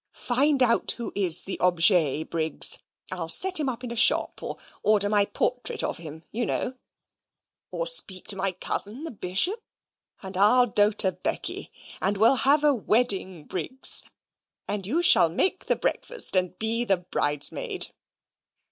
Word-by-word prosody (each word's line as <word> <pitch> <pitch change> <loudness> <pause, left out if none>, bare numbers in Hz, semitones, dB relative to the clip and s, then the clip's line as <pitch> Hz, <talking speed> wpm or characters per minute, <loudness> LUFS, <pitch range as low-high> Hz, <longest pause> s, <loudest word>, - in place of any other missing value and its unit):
Find 275 +1 +2
out 235 -1 +1
who 235 - -7
is 185 -5 +2
the 190 - -6
objet, 170 -4 +2
Briggs. 160 -2 +1 0.3
I'll 175 -3 -5
set 370 - +3
him 290 -3 -1
up 250 0 -7
in 245 - -6
a - - -5
shop; 220 - +3
or - - -6 0.2
order 205 -1 +3
my 205 -1 +2
portrait 250 +4 -3
of - - -3
him, 160 -1 -10
you 240 +3 -3
know; 250 - -3 1.0
or - - -4
speak 210 - +2
to 200 - +5
my 195 0 -2
cousin, 205 - +1
the 330 - -6
Bishop 210 - +1 0.6
and 190 0 -6
I'll 215 +6 +4
doter 205 -3 +1
Becky, - - -4 0.3
and 195 +2 0
we'll 225 +6 +3
have 285 +3 +2
a 295 -1 +3
wedding, 205 - -1
Briggs, 260 +10 -3 0.6
and 200 -2 -4
you 330 +10 -1
shall 170 - +6
make 370 - -1
the - - +2
breakfast, - - -2
and 185 0 -1
be 225 +2 +1
a 195 - +4
bridesmaid." 150 -4 -1
205 Hz, 155 wpm, -24 LUFS, 185-250 Hz, 1.0 s, shall